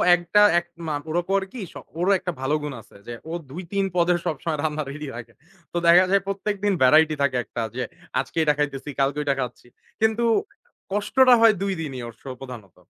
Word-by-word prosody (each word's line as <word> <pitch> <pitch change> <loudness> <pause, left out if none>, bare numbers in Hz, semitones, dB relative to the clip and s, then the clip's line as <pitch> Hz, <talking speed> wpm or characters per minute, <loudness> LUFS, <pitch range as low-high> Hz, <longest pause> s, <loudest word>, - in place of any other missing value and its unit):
একটা 175 +4 +2 0.2
এক 175 - -12 0.2
মা 150 - -1
ওরা 175 +2 +1
করে 195 -1 +2
কি, 250 - -7
স - - -31 0.2
ওরও 185 +3 +2
একটা 180 -1 -3
ভালো 135 +3 +1
গুণ 145 -2 -4
আছে 110 - -22
যে 120 - -5 0.2
ও - - -5 0.2
২-৩ 185 +5 -3
পদে 175 0 +3
সবসময় 155 +1 -2
রান্না 155 -1 -1
রেডি 150 +1 -6
রাখে 115 -1 -9 0.4
তো 175 - -3
দেখা 180 +2 +7
যায় 200 -1 +4
প্রত্যেকদিন 200 0 -1
ভ্যারাইটি 155 +4 +5
থাকে 130 -3 +2
একটা 115 - -5
যে 130 - -2 0.4
আজকে 135 +5 -5
এইটা 150 -2 +3
খাইতেছি, 145 -1 -2
কালকে 140 +1 +1
ওইটা 140 -2 0
খাচ্ছি। 125 -1 -5 0.3
কিন্তু 220 +1 +2 0.7
কষ্টটা 250 +5 +4
হয় 225 -1 +7
২ 195 -1 0
দিনই 135 -5 -5
ওর 115 - -9
শো 135 - -9
প্রধানত। 120 -8 -10
155 Hz, 195 wpm, -24 LUFS, 135-195 Hz, 0.7 s, দেখা